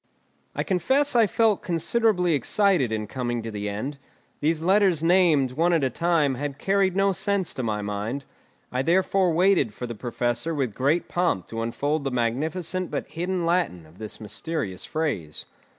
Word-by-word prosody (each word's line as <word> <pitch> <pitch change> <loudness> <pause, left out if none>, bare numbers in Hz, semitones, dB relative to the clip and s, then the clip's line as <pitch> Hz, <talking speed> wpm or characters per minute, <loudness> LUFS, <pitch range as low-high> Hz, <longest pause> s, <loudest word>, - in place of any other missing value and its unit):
I - - -1
confess 265 - +1
I 230 -3 +5
felt 220 0 +2
considerably 180 +1 +1
excited 165 - +2
in 110 -1 -2
coming 120 -1 -3
to 115 - -5
the 105 -1 -3
end; 130 +8 -5 0.4
these 160 +1 0
letters 190 -3 +3
named, 165 -7 +4
one 165 +6 +2
at 165 -4 +2
a 130 - +1
time, 165 -2 +1
had 140 +2 -4
carried 195 -1 +1
no 195 0 +3
sense 195 -1 -1
to - - -4
my 105 -3 -2
mind; 105 +7 -3 0.5
I 125 - 0
therefore 185 +3 +2
waited 170 - +3
for 125 - -5
the 120 - -5
Professor 120 +6 -2
with 130 -7 -1
great 145 +9 +1
pomp 175 - 0
to 115 0 -4
unfold 145 +6 -1
the 135 - -1
magnificent 155 +9 -1
but - - -4
hidden 175 +3 -2
Latin 170 - 0
of 80 +4 -19
this 110 -1 -8
mysterious 110 - -4
phrase. 130 - -3
155 Hz, 170 wpm, -25 LUFS, 120-180 Hz, 0.5 s, I